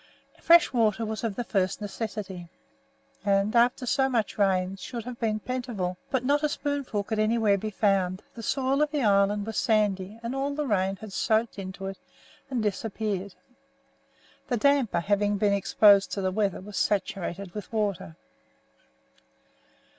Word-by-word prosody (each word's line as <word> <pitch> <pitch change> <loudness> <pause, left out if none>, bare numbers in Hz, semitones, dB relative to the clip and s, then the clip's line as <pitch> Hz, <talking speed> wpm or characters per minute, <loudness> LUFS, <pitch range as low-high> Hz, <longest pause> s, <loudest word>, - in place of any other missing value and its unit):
Fresh 340 -3 +6
water 225 -2 +2
was 220 +1 -4
of 220 -4 -2
the 245 - -2
first 190 -5 0
necessity, 200 -4 -5 0.7
and, 200 +2 +1
after 245 +2 +3
so 265 +2 +2
much 230 -5 -1
rain, 190 -2 +1
should 235 +4 -6
have 250 -1 -7
been 215 -2 0
plentiful, 235 -7 -3
but 255 -2 -1
not 290 +2 +2
a 300 - +1
spoonful 285 -8 -2
could 220 +1 -3
anywhere 215 -1 +3
be 215 +2 -3
found: 195 -3 0
the 235 - -8
soil 270 +4 0
of 300 - +2
the 290 -3 -1
island 200 0 +3
was 225 -1 -5
sandy, 210 -2 +1
and 235 +2 -3
all 275 +1 -2
the 300 0 -2
rain 195 -5 +1
had 200 0 -10
soaked 220 0 0
into 195 0 -7
it 195 0 -6 0.5
and 250 -4 -1
disappeared. 205 -1 -3 1.1
The 245 - 0
damper 270 -7 +2
having 205 +2 +1
been 205 0 +2
exposed 200 0 +5
to 200 - -2
the 185 -1 0
weather 200 -1 -1
was 205 +1 -8
saturated 195 -2 -2
with 210 - -7
water. 205 -7 -2
210 Hz, 160 wpm, -27 LUFS, 195-235 Hz, 1.1 s, Fresh